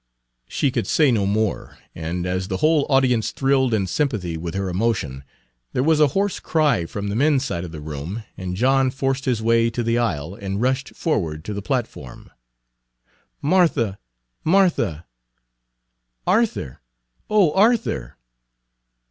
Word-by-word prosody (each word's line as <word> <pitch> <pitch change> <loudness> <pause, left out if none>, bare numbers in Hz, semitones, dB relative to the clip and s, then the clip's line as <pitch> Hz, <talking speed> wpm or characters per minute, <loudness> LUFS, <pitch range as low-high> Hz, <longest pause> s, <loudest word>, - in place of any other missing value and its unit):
She 140 - 0
could - - -2
say 150 -4 +4
no 105 -4 +1
more, 110 +1 -1 0.2
and 85 +2 -4
as 90 +1 -2
the 95 - -2
whole 155 - +2
audience 130 -5 +3
thrilled 135 -2 +1
in 105 -4 +1
sympathy 95 - -1
with 85 +2 -5
her 100 0 -1
emotion, 90 - -1 0.5
there 125 - +1
was 160 +1 +3
a 150 - +6
hoarse 200 0 0
cry 150 - +1
from 100 +3 -4
the 100 - -2
men's 140 +2 +2
side 85 -9 -3
of 85 - -7
the 80 - -7
room, 80 +9 -6
and 90 -1 -5
John 130 +4 +3
forced 135 +1 -2
his 120 -4 0
way 115 0 +3
to 120 +1 -3
the 115 +1 +1
aisle 85 -8 -2
and 100 0 -4
rushed 130 +3 -1
forward 80 - -2
to 105 - -4
the 100 - -4
platform. 110 - -4 1.1
"Martha! 145 - +2 0.4
Martha!" 165 - +2 1.2
"Arthur! 205 - 0 0.5
O 200 -7 +4
Arthur!" 205 - +1
115 Hz, 150 wpm, -22 LUFS, 90-140 Hz, 1.2 s, a